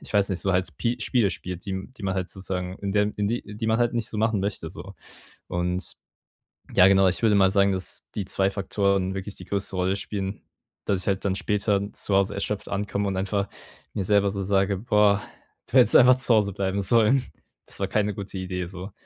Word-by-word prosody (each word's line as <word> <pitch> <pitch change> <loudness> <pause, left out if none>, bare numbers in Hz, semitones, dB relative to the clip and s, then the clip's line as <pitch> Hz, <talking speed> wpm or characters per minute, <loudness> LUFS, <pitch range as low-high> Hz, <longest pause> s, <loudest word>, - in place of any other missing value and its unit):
ich - - -11
weiß 100 -1 +3
nicht, 95 - -1
so 95 -1 +1
halt 90 0 +1
Spi 115 +10 -2
Spiele 115 -7 +2
spielt, 90 0 -7
die - - -4
m 95 +6 -6
die - - -11
man 95 0 0
halt 95 -1 -2
sozusagen, 95 -1 -5
in 100 -1 -3
der 105 0 +2
in 105 0 0
die 120 +2 -2
die 110 0 -3
man 110 +1 +2
halt 120 0 +1
nicht 115 -2 -2
so 105 - -4
machen 110 -2 +1
möchte 100 -5 -3
so. 100 +1 -10 0.5
Und 90 +1 -2 0.8
ja, 90 - +7
genau, 95 -1 +5
ich 95 - 0
würde 105 -2 +4
mal 95 -1 +4
sagen, 100 0 +3
dass 95 -1 -4
die 100 - -2
2 95 0 +1
Faktoren 100 -1 0
wirklich 95 +1 -5
die - - -10
größte 100 -1 -3
Rolle 95 +1 +1
spielen, 100 0 -5 0.4
dass 95 -2 +1
ich - - -7
halt 95 -1 0
dann 95 -1 +1
später 105 0 0
zu 100 - -1
Hause 100 +1 +2
erschöpft 100 +1 -3
ankomme 100 0 -2
und 95 -1 -2
einfach 100 +1 -1 0.4
mir 100 - -2
selber 100 -1 +3
so 100 -1 -4
sage: 100 0 +1
„Boah, 105 -1 +3 0.5
du 130 - +2
hättest 125 - +7
einfach 130 0 +7
zu 125 -2 +4
Hause 100 -3 +2
bleiben 100 0 -1
sollen.“ 115 +6 +4 0.4
Das - - -13
war 95 - 0
keine 105 +1 0
gute 100 -1 -6
Idee, 90 -1 -3
so. 95 +2 -8
100 Hz, 225 wpm, -25 LUFS, 95-105 Hz, 0.8 s, ja